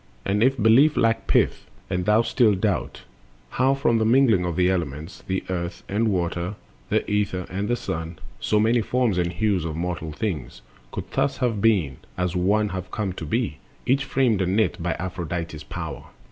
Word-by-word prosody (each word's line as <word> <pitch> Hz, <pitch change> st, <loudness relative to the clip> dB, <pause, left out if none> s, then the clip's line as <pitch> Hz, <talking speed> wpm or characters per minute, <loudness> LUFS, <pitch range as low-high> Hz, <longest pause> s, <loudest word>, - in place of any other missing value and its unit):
And 100 Hz, +2 st, +1 dB
if 135 Hz, +3 st, +3 dB
belief 125 Hz, +7 st, +5 dB
lack 115 Hz, -1 st, +2 dB
pith, -, -, +2 dB, 0.2 s
and 90 Hz, -1 st, -2 dB
thou 105 Hz, +3 st, +4 dB
still 115 Hz, -3 st, +3 dB
doubt 100 Hz, 0 st, -2 dB, 0.5 s
How 130 Hz, +2 st, +2 dB
from 125 Hz, -5 st, +2 dB
the -, -, +2 dB
mingling 115 Hz, -5 st, +4 dB
of 85 Hz, -2 st, -2 dB
the 90 Hz, +1 st, +3 dB
elements, 85 Hz, -1 st, -3 dB
The 95 Hz, 0 st, -1 dB
Earth 85 Hz, -1 st, -4 dB
and 110 Hz, +3 st, +1 dB
Water, 90 Hz, 0 st, -1 dB, 0.3 s
the -, -, +1 dB
Ether 100 Hz, -3 st, 0 dB
and 100 Hz, +2 st, -2 dB
the 120 Hz, -, +1 dB
Sun, 80 Hz, -6 st, -5 dB, 0.2 s
So 105 Hz, -, +1 dB
many 115 Hz, +2 st, +3 dB
forms 120 Hz, -5 st, +1 dB
and 85 Hz, -1 st, 0 dB
hues 100 Hz, -3 st, 0 dB
of 80 Hz, -2 st, -3 dB
mortal 85 Hz, -2 st, -3 dB
things 75 Hz, -, -4 dB, 0.3 s
Could -, -, -6 dB
thus -, -, 0 dB
have 115 Hz, -5 st, 0 dB
being, 95 Hz, -, +2 dB, 0.2 s
as 90 Hz, -1 st, 0 dB
have 95 Hz, 0 st, 0 dB
come 100 Hz, -4 st, -2 dB
to 85 Hz, -, -6 dB
be, 115 Hz, -4 st, -1 dB, 0.3 s
Each 135 Hz, +2 st, +2 dB
framed 125 Hz, -7 st, +1 dB
and 95 Hz, +1 st, +1 dB
knit 110 Hz, -5 st, +1 dB
by 85 Hz, -3 st, -1 dB
Aphrodite's 85 Hz, -3 st, -4 dB
power... -, -, -6 dB
95 Hz, 180 wpm, -24 LUFS, 85-115 Hz, 0.5 s, belief